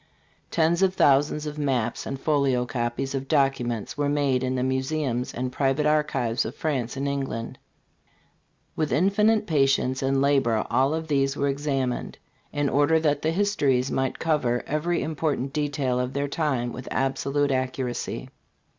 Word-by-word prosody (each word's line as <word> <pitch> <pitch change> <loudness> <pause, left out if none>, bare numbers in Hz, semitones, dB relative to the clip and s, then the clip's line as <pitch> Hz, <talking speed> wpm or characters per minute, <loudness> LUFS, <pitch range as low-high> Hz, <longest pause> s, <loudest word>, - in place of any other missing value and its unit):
Tens 170 +2 +2
of 190 -1 +3
thousands 145 +1 +3
of 150 0 -5
maps 125 -5 -1
and 135 - -4
folio 135 -5 +1
copies 120 +2 -2
of 135 0 -3
documents 135 -6 0
were 145 -1 +1
made 140 -3 +1
in 130 0 -1
the 125 - 0
museums 130 -1 -1
and 125 +1 -3
public 135 +2 +1
archives 140 -6 +1
of 115 - -6
France 135 -5 -2
and 140 +1 -1
England. 135 -5 -3 1.2
With 155 -2 -1
infinite 210 +5 +3
patience 135 -5 +2
and 135 0 +1
labor 135 -6 +2
all 135 +4 +2
of 160 0 -4
these 135 -2 +1
were 140 0 +1
examined, 135 -3 -2 0.3
in 145 -1 0
order 145 +4 +3
that 150 -2 +1
the 155 - +1
histories 145 -9 +1
might 130 -1 -1
cover 135 -7 0
every 165 +4 -1
important 150 -4 -2
detail 145 -4 -1
of 125 +1 -2
their 140 +1 -1
time 135 -6 -1
with 125 - -8
absolute 140 +2 0
accuracy. 130 -1 -3
135 Hz, 155 wpm, -25 LUFS, 130-150 Hz, 1.2 s, of